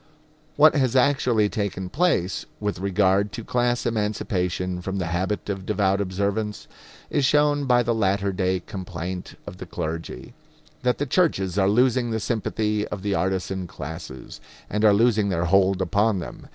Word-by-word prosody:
What 155 +1 +6
has 130 -4 +1
actually 125 -5 +3
taken 100 -3 -3
place 135 - 0
with 105 -2 -2
regard 100 +1 +2
to 115 - -5
class 120 +1 0
emancipation 95 -5 -1
from 95 +2 -4
the 95 - -1
habit 95 +4 -2
of 95 -2 -3
devout 100 -1 +1
observance 100 +2 -2 0.4
is 145 - +1
shown 145 +1 +3
by 125 -2 +4
the 120 0 +1
latter 100 -2 0
day 95 -1 0
complaint 90 -3 -6
of - - -8
the - - -8
clergy 80 +1 -5 0.5
that 125 0 +1
the 145 - -1
churches 125 - +1
are 95 0 +3
losing 125 +2 +2
the 110 -1 -1
sympathy 105 -1 -1
of 100 -2 -6
the 100 -1 0
artisan 95 0 -1
classes, 75 -4 -8 0.3
and 105 +2 -1
are 105 - +7
losing 105 -1 +3
their 85 -2 0
hold 95 +1 +3
upon 100 +3 +1
them. 90 - -8
100 Hz, 160 wpm, -24 LUFS, 95-115 Hz, 0.5 s, are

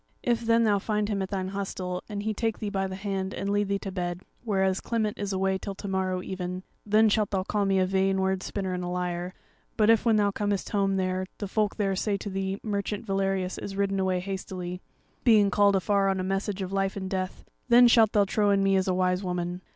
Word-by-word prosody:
If 235 -1 +1
then 230 0 +3
thou 205 -2 +3
find 210 +1 -1
him 200 -2 -1
at 190 - -3
thine 190 -2 -2
hostel, 185 -2 -4
and 205 -1 -4
he 220 0 -1
take 225 0 -1
thee 210 -2 -4
by 195 -1 -1
the 190 - -6
hand 195 -1 -3
and 200 - -2
lead 205 0 +1
thee 200 0 0
to 195 0 -6
bed, 175 -1 -3 0.2
whereas 190 -4 +1
Clement 220 -3 -1
is 205 -1 -2
away 190 0 0
till 200 0 -5
to 200 - -7
morrow 185 -1 -1
even, 185 0 -5 0.2
then 215 +1 +4
shalt 210 -1 +2
thou 190 -2 -1
call 205 +1 0
me 195 -1 +2
a 185 - +3
vain 190 +1 +1
word 190 0 0
spinner 190 -2 -3
and 180 0 -3
a - - -3
liar; 180 0 -3 0.4
but 220 0 +5
if 225 - +3
when 230 -2 +3
thou 205 -1 +3
comest 205 -1 -2
home 195 -2 +1
there, 185 0 -1
the 205 - -4
folk 210 +1 0
there 195 -2 0
say 200 +1 0
to 200 +1 -6
thee 195 +1 -2
merchant 205 0 -3
Valerius 195 -2 -1
is 195 - -6
ridden 195 -1 0
away 185 -1 +1
hastily, 185 -1 -5 0.4
being 210 -4 +5
called 200 +1 +4
afar 195 +1 +2
on 190 -1 0
a - - -1
message 195 +1 -2
of 185 +1 -5
life 195 0 0
and 190 -1 -4
death, 185 -1 -4 0.2
then 240 +1 +8
shalt 225 -3 +5
thou 205 -1 +4
trow 205 +1 +1
in 200 -1 +3
me 195 0 +3
as 190 0 +1
a 185 - +1
wise 185 +1 +1
woman. 180 0 -3
195 Hz, 240 wpm, -27 LUFS, 185-205 Hz, 0.4 s, then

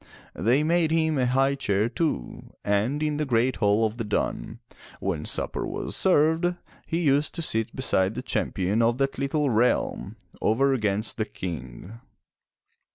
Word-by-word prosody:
They 120 - +2
made 165 0 +2
him 160 -2 +1
a 125 - +2
high 135 +2 +2
chair 105 -6 0
too, 140 - -3
and 110 +9 +1
in 150 -1 0
the 155 - 0
great 125 0 +1
hall 105 +1 +3
of 110 +1 -3
the 115 - -2
dun, 105 -1 -2 0.4
when 90 -6 -2
supper - - -2
was - - -4
served, 170 0 +3 0.3
he 165 +1 -1
used 145 0 +2
to 170 - -3
sit 115 -5 0
beside 105 -6 +1
the - - -4
Champion 95 +5 0
of 115 +1 +2
that 135 -1 -1
little 140 0 0
realm, 120 +3 +1 0.3
over 135 +5 +3
against 105 -3 -1
the 110 - 0
King. 90 - -7
125 Hz, 160 wpm, -26 LUFS, 105-150 Hz, 0.4 s, hall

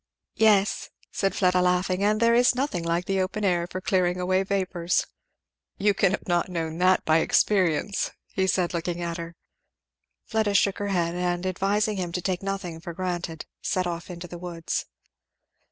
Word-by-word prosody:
"Yes," 210 -2 +3 0.2
said 195 -1 -1
Fleda 180 -1 +3
laughing; 180 +1 +1
"and 210 +1 +2
there 230 +1 +4
is 245 +1 +4
nothing 255 -10 -1
like 170 +1 0
the 195 -1 0
open 200 +3 -2
air 175 -2 +1
for 185 - -4
clearing 180 -2 +1
away 185 +1 +2
vapours." 185 -3 0 0.7
"You 205 +1 +3
cannot 195 0 +1
have 175 0 +1
known 165 -2 -3
that 185 +1 +3
by 160 +1 +4
experience," 190 +1 +2 0.4
said 180 -2 +1
he - - -4
looking 175 +1 -2
at 170 0 -3
her. 170 0 -7 0.9
Fleda 215 -3 0
shook 200 -1 +3
her 205 - -2
head 170 -4 0
and 175 0 -1
advising 200 +3 0
him 180 -2 -3
to 180 - -2
take 185 -2 -1
nothing 195 -4 -4
for 170 +1 -7
granted, 175 -3 -3 0.2
set 185 -1 0
off 170 0 -4
into 175 0 -7
the 175 0 -9
woods. 170 -2 -3
180 Hz, 170 wpm, -26 LUFS, 175-195 Hz, 0.9 s, there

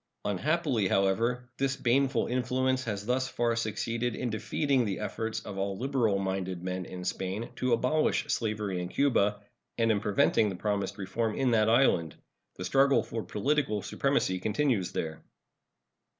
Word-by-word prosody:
Unhappily, 130 - +1
however, 115 +7 +1
this 135 0 +1
baneful 135 -1 +2
influence 130 +1 0
has 105 -3 -3
thus 130 +2 0
far 120 -2 0
succeeded 115 +1 -2
in 125 -2 -2
defeating 125 +5 +1
the 100 -4 -2
efforts 110 0 -3
of 95 -1 -7
all 100 0 -2
liberal 125 -5 +1
minded 95 -2 -3
men 90 0 -3
in 90 +1 -7
Spain 95 +6 -3
to 125 -1 +1
abolish 125 +6 +2
slavery 105 -5 -1
in 90 - -3
Cuba, 105 -5 +2 0.4
and 115 -1 +3
in 105 - +2
preventing 105 +1 +2
the 95 - -4
promised 100 +1 -2
reform 105 +3 -2
in 130 -2 +1
that 110 -1 +3
island. 110 - +3 0.4
The 90 - -5
struggle 135 +7 +4
for 115 - -4
political 110 -3 0
supremacy 95 0 0
continues 110 -1 0
there. 80 -1 -4
110 Hz, 150 wpm, -29 LUFS, 100-125 Hz, 0.4 s, struggle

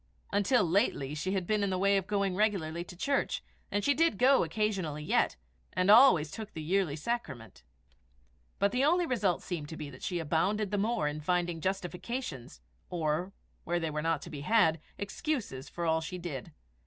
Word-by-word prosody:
Until 205 +4 +3
lately, 165 - +1
she 170 +6 -2
had 190 -2 -1
been 210 +2 +1
in 200 - +1
the 185 - 0
way 200 +2 +3
of 195 -1 0
going 200 -3 0
regularly 180 -6 0
to 180 - -11
church, 280 +8 0 0.3
and 205 0 -1
she 285 - +4
did 320 -6 +2
go 265 +4 +5
occasionally 170 -4 -2
yet, - - +2 0.4
and 185 +2 +3
always 185 - +7
took 215 +2 -7
the 160 - -6
yearly 180 -2 +1
sacrament; 150 - -4 1.0
but 200 0 +2
the 250 +3 +1
only 345 +4 +3
result 210 - 0
seemed 160 -5 -4
to 160 - -7
be 145 -2 -6
that 130 - -13
she 180 - -2
abounded 185 +6 0
the 205 - 0
more 210 -7 +1
in 150 +1 -3
finding 175 0 0
justifications, 180 - -4 0.3
or, 165 +2 -1 0.3
where 175 +1 0
they 165 -2 -2
were 150 0 -2
not 165 -1 0
to - - -9
be 145 - -6
had, 165 -2 +3 0.2
excuses, 200 - -3
for 170 - -4
all 160 0 +2
she 180 +3 -5
did. 170 -8 -6
180 Hz, 190 wpm, -31 LUFS, 160-210 Hz, 1.0 s, always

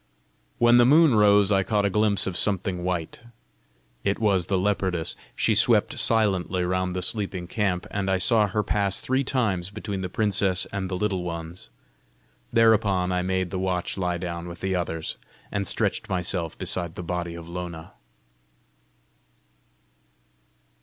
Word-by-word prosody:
When 120 0 +5
the 120 - +6
moon 155 0 +6
rose 105 -1 +4
I 95 -1 +4
caught 105 +1 0
a - - +2
glimpse 105 -1 +2
of 95 - -3
something 95 -2 -1
white; 90 -3 -3 0.8
it 100 - 0
was 100 -6 +1
the 95 - +1
leopardess. 95 -3 -1 0.2
She - - +1
swept - - +2
silently 95 -5 +1
round 90 0 -1
the 90 - -1
sleeping 95 -3 +2
camp, 90 -1 -1
and 100 -1 -2
I 95 - +2
saw 105 +2 +3
her 105 +1 -1
pass 100 0 0
three 130 +1 0
times 105 -10 -1
between 100 -2 -5
the 90 - -4
princess 95 -2 0
and 95 -2 -3
the 90 - -3
Little 95 -2 -1
Ones. 85 0 -7 0.8
Thereupon 105 -5 +3
I 90 0 0
made 95 0 -1
the 95 - -3
watch 90 -1 -2
lie 90 -2 -1
down 85 -1 -5
with 85 0 -9
the 95 0 -1
others, 80 -2 -3 0.3
and 100 -2 -2
stretched - - 0
myself 90 -2 -1
beside 85 -2 -3
the 90 - -6
body 85 -1 -4
of 85 -1 -9
Lona. 85 -2 -7
95 Hz, 155 wpm, -25 LUFS, 90-105 Hz, 0.8 s, the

